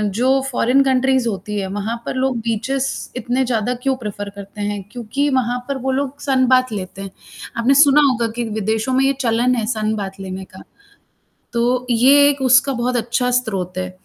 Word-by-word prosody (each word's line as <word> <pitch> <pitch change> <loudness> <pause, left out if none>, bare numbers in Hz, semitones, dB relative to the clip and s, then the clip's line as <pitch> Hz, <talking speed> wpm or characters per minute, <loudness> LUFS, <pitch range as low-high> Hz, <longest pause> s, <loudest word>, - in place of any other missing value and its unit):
जो 260 +4 +2
foreign 250 +2 +3
countries 265 -1 +2
होती 205 0 -4
है 195 - -3
वहाँ 215 +3 -2
पर - - -4
लोग 260 -1 0
बीचेज़ 255 +5 -1 0.3
इतने 250 +2 0
ज़्यादा 240 -1 0
क्यों 270 -1 +1
प्रेफर 205 -3 -6
करते 200 +1 -9
हैं, 205 0 -2
क्योंकि 250 +4 -2
वहाँ 245 -1 0
पर 280 -1 -2
वो 265 - +1
लोग 275 +1 -2
सनबाथ 255 -2 +2
लेते 195 -1 -6
हैं। 195 - -6 0.5
आपने 235 +4 +3
सुना 290 0 +5
होगा 235 -2 0
कि 240 - -2 0.2
विदेशों 220 +4 -1
में 260 +1 +3
ये 275 - +3
चलन 240 +1 +2
है 230 -3 -1
सनबाथ 215 -3 -3
लेने 190 0 -6
का। - - -11 0.9
तो 245 +1 0
ये 275 +5 +6
एक 280 -1 -1
उसका 255 +1 +4
बहुत 245 +1 -1
अच्छा 240 +2 0
स्रोत 185 -6 -4
है। 185 0 -3
245 Hz, 185 wpm, -19 LUFS, 215-260 Hz, 0.9 s, ये